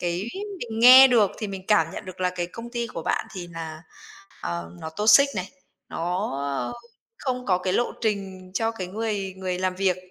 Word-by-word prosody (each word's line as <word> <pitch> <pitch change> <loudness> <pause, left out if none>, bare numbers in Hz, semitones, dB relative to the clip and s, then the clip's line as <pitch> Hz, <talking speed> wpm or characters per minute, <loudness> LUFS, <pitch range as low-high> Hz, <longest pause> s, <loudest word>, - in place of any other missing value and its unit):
cái 175 +2 -2 0.4
mình 225 -2 -5
nghe 255 +2 +10
được 225 -6 +4
thì 215 - -3
mình 190 -1 -7
cảm 165 -7 +4
nhận - - -7
được 185 0 -10
là 180 - +1
cái 175 -1 -3
công 230 +6 -9
ty 235 -1 -2
của 165 -7 -7
bạn - - -1
thì 175 -2 -6
là 160 -1 -7 0.6
ờ 85 0 -4
nó 160 - -6
toxic 215 - +6
này, 185 0 -3 0.4
nó, 180 +5 -2
ờ, 135 -4 -2 0.5
không 250 -2 -3
có 180 -2 +3
cái 185 0 -2
lộ 240 - +1
trình 195 -4 -3
cho 225 +3 +1
cái 190 -5 -5
người 200 -1 -3
người 185 -1 -3
làm 185 0 -1
việc, 190 -2 +1
190 Hz, 200 wpm, -25 LUFS, 180-220 Hz, 0.6 s, nghe